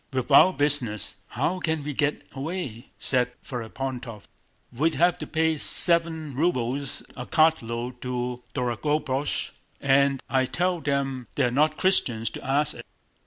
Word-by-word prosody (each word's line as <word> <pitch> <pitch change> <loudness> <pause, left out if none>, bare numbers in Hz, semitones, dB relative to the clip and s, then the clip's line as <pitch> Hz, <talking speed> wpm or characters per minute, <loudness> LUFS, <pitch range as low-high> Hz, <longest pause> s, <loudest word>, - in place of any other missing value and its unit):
"With 130 +1 -3
our 160 +7 +8
business, 145 - +2
how 160 +9 -2
can 160 -3 -1
we 150 0 -4
get 145 +2 -1
away?" 135 -5 -5
said 125 -1 0
Ferapóntov. 125 -2 -6 0.5
"We'd 155 +7 0
have 175 +3 +2
to - - -6
pay 160 0 +1
seven 165 -2 +3
rubles 135 -3 -1
a 125 -1 -7
cartload 125 -6 +1
to 125 -1 -3
Dorogobúzh 135 +3 -1 0.3
and 140 0 +3
I 130 -1 +1
tell 180 +2 -1
them 135 -3 -2
they're 120 - +1
not 150 +4 +2
Christians 120 -12 +2
to - - -9
ask 140 +3 +1
it! - - -10
140 Hz, 135 wpm, -25 LUFS, 125-155 Hz, 0.5 s, our